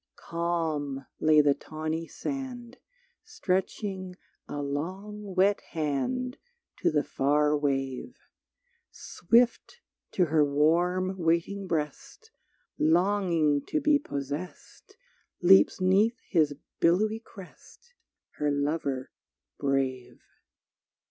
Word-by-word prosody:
Calm 160 -5 -2
lay 155 -1 +5
the 145 -1 +4
tawny 155 +2 -5
sand 260 - -6 0.4
Stretching 190 - -3 0.3
a 145 - -5
long 190 +8 -5
wet 195 +2 +3
hand 215 - -2 0.4
To - - +1
the 150 -1 +1
far 150 +3 +2
wave. 135 - -2 0.7
Swift 235 - +1 0.4
to 180 - +3
her 155 -1 +3
warm 175 +6 +1
waiting 170 +4 0
breast 165 - -4 0.5
Longing 170 -3 +2
to 310 - 0
be 300 -1 +3
possessed 145 - -7 0.4
Leaps 190 +2 +5
'neath 200 +6 +3
his 155 -4 +2 0.2
billowy 210 +6 +2
crest 230 - -15 0.4
Her 150 - 0
Lover 145 -2 -2 0.5
brave. 135 -3 -2
170 Hz, 90 wpm, -28 LUFS, 145-200 Hz, 0.7 s, lay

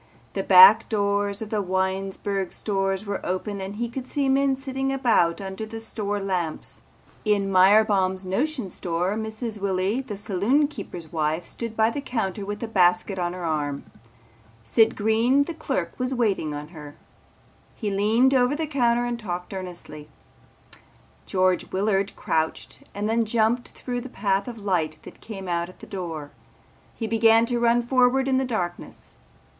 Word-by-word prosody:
The - - -1
back 465 +1 +8
doors 200 -1 0
of 215 - -10
the 215 -2 0
Winesburg 190 +1 -2
stores 195 -1 -2
were 200 -1 -4
open 195 +2 -3
and 195 +2 -5
he 235 +2 -2
could 255 +2 -6
see 280 0 -1
men 270 0 +3
sitting 270 0 -3
about 235 -11 +2
under 190 +1 -6
the 225 +1 -6
store 205 -2 -3
lamps. 180 -5 -3 0.4
In 200 -2 +1
Myerbaum's 190 -1 +4
Notion 245 - -2
Store 175 +3 -2
Mrs. 220 0 -4
Willy 195 +5 0
the 230 -7 -7
saloon 215 +8 +1
keeper's 175 - -8
wife 160 +1 -1
stood 230 -2 -6
by 220 +1 +3
the 285 - -4
counter 220 -7 -3
with 205 +2 -4
a - - -2
basket 185 -1 +2
on 175 0 -1
her 180 -1 -5
arm. 145 -3 -2 0.8
Sid 220 - +3
Green 225 +6 +3
the 335 - -5
clerk - - -3
was 255 +1 -1
waiting 195 -11 0
on 150 +1 -7
her. 150 -4 -11 0.8
He 210 -3 -3
leaned 220 +7 +3
over 255 +1 +3
the 320 +1 -2
counter 240 -5 +1
and 240 -1 -3
talked 180 -3 -5
earnestly. 175 -5 -8 1.2
George 185 -1 +1
Willard 195 0 0
crouched 160 0 -3
and 205 +1 -2
then 230 +1 +2
jumped 225 +2 +1
through 245 -1 -5
the 260 - -8
path 195 -2 -1
of 240 -2 -6
light 180 -7 -1
that - - -13
came 195 -4 -8
out 170 0 -1
at 185 - -15
the - - -12
door. 165 -6 -6 0.6
He 230 - -4
began 225 +1 +4
to 240 0 -1
run 235 0 +3
forward 255 +2 +3
in 265 -1 +2
the 265 - +1
darkness. 180 -8 -5
205 Hz, 165 wpm, -24 LUFS, 185-235 Hz, 1.2 s, back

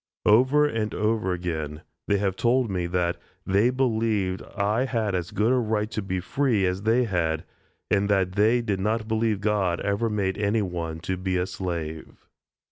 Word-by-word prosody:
Over 130 +7 +5
and 110 -7 -2
over 105 -3 0
again, 80 -4 -4 0.2
they 100 - +3
have 95 -1 0
told 120 +1 +2
me 90 -2 -1
that 85 -1 0 0.3
"they 100 +5 +3
believed 110 -7 0 0.2
I 105 +6 +1
had 115 -6 -1
as 90 -2 -2
good 110 +4 +1
a 130 - +3
right 110 -2 0
to 110 - -2
be 95 -1 -2
free 110 +2 +1
as 90 +1 -1
they 115 +4 +3
had," 85 -7 -1 0.5
and 100 +1 +2
that 95 -2 +2
"they 110 +5 +3
did 100 -4 -1
not 110 +3 -1
believe 110 -2 0
God 100 -5 +1
ever 100 +3 0
made 100 -2 -1
any 105 +1 +1
one 85 -3 -4
to 95 +1 -2
be 95 0 -1
a 90 - +1
slave." 85 -5 -5
100 Hz, 180 wpm, -25 LUFS, 90-110 Hz, 0.5 s, Over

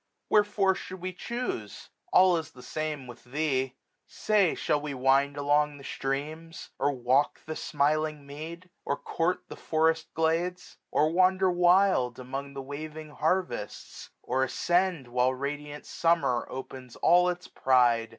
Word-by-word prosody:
Wherefore 205 -2 +3
should 185 0 -8
we 185 +1 -4
chuse? 210 - -5 0.2
All 185 -1 +6
is 160 -2 -3
the 125 - -15
same 155 -3 -4
with 120 -1 -12
thee. 135 -1 -1 0.3
Say, 205 -5 +2
shall 145 - 0
we 145 -2 -4
wind 135 +2 +2
Along 145 +1 +2
the 140 - -13
streams? 155 +6 -4
or 140 +1 +2
walk 130 +2 +1
the 155 - -5
smiling 150 0 0
mead? 165 +5 -9
Or 140 - -1
court 180 +2 -1
the - - -8
forest 160 0 0
glades? 170 +3 -1
or 155 +1 +2
wander 185 +1 +3
wild 175 -8 +3
Among 135 +2 -6
the 135 - -5
waving 155 +2 -7
harvests? 160 - -2
or 130 +2 0
ascend, 175 0 +1
1405 120 - -17
While 125 +1 +2
radiant 145 +2 -5
Summer 165 -8 +1
opens 130 -1 -8
all 180 +1 +4
its 180 0 -4
pride. 120 -3 +3
150 Hz, 145 wpm, -28 LUFS, 135-175 Hz, 0.3 s, All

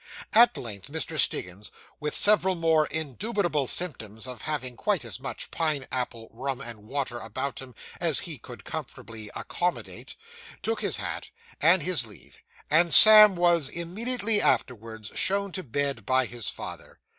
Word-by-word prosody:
At 235 +2 +6
length 105 -5 -8
Mr. 160 +1 -4
Stiggins, 95 -2 0 0.3
with 150 0 -2
several 195 -3 +4
most 160 -2 +1
indubitable 160 - -2
symptoms 110 - -1
of 125 -2 -8
having 130 -5 -4
quite - - -1
as - - -5
much - - -7
pine 155 -5 -1
apple 120 -3 -4
rum 130 +3 -5
and 115 -5 -10
water 130 -2 -3
about 130 +5 -5
him 130 -3 -12 0.2
as - - +3
he - - -8
could - - -12
comfortably 110 -2 -8
accommodate, 175 0 -4 0.5
took 455 - -2
his - - 0
hat, - - -6 0.3
and 175 +2 +4
his 165 -10 0
leave; 105 - -17 0.3
and 165 -1 +5
Sam 215 0 +10
was, 170 -5 +2
immediately 210 - 0
afterwards, 110 -3 -1
shown 200 0 -1
to 185 - -5
bed 140 - -2
by 130 +3 +1
his 120 -3 -4
father. - - -9
145 Hz, 150 wpm, -26 LUFS, 120-180 Hz, 0.5 s, Sam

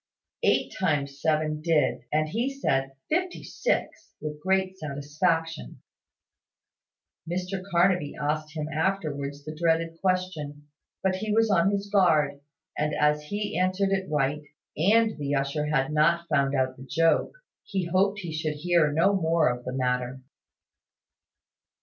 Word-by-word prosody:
Eight - - +2
times 145 -6 0
seven 155 -1 +1
did, 150 -6 +1
and 155 +1 +2
he 235 - -1
said 135 - -1 0.2
"fifty 355 +3 -1
six" - - -2
with 150 -1 -6
great 190 +1 +1
satisfaction, 150 - -2 1.5
Mr 185 +2 -3
Carnaby 175 -3 +2
asked 155 +1 -2
him 150 0 -2
afterwards 145 -5 -2
the 155 - -5
dreaded 165 0 0
question, 175 -6 -2 0.4
but 190 -1 +1
he 215 +2 -3
was 225 0 +3
on 180 0 +4
his 200 0 -1
guard; 155 -8 +3 0.3
and 150 0 -1
as 150 0 +2
he 205 +3 -3
answered 185 +2 +1
it 190 -1 -1
right, 150 0 0 0.3
and 215 +5 +3
the 145 0 -1
usher 140 +2 -1
had 150 -1 0
not 170 +3 +3
found 140 -3 +2
out 130 -1 0
the 130 - -10
joke, 165 0 +2 0.3
he 195 -3 -2
hoped 195 +4 +1
he 170 -3 -5
should 155 -1 -2
hear 165 -1 +2
no 170 +7 +3
more 165 -5 +2
of 125 0 -4
the 125 - -3
matter. 125 0 -1
160 Hz, 140 wpm, -27 LUFS, 145-185 Hz, 1.5 s, on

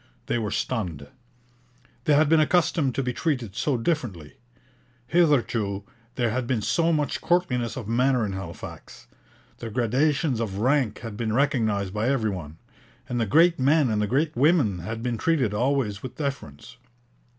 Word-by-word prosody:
They 120 - -1
were 110 -2 -2
stunned. 90 - -3 1.0
They 150 - +4
had 155 +1 +4
been 160 +1 +4
accustomed 155 -4 +2
to 135 - 0
be 125 0 -2
treated 125 - -2
so 130 +3 0
differently. 115 - -3 0.7
Hitherto 120 - +1 0.3
there 120 -3 0
had 125 +1 -2
been 120 -5 0
so 165 +7 +2
much 150 -3 -1
courtliness 135 -11 0
of 120 -6 -6
manner 125 +1 +2
in 100 - -4
Halifax; 95 -3 -9 0.5
the 115 - -5
gradations 130 +3 +1
of 105 -4 -3
rank 125 0 +1
had 115 -3 -7
been 110 -2 -2
recognized 110 -7 +1
by 105 +4 0
every 115 -6 +1
one; 80 -4 -7 0.5
and 120 -2 -2
the 110 - 0
great 165 - +4
men 140 -1 +3
and 105 -1 0
the 105 - 0
great 150 +7 0
women 135 - +3
had 110 +6 -5
been 120 -3 -2
treated 135 -9 +1
always 120 -3 0
with 130 - -8
deference. 135 - -6
120 Hz, 160 wpm, -25 LUFS, 105-145 Hz, 1.0 s, They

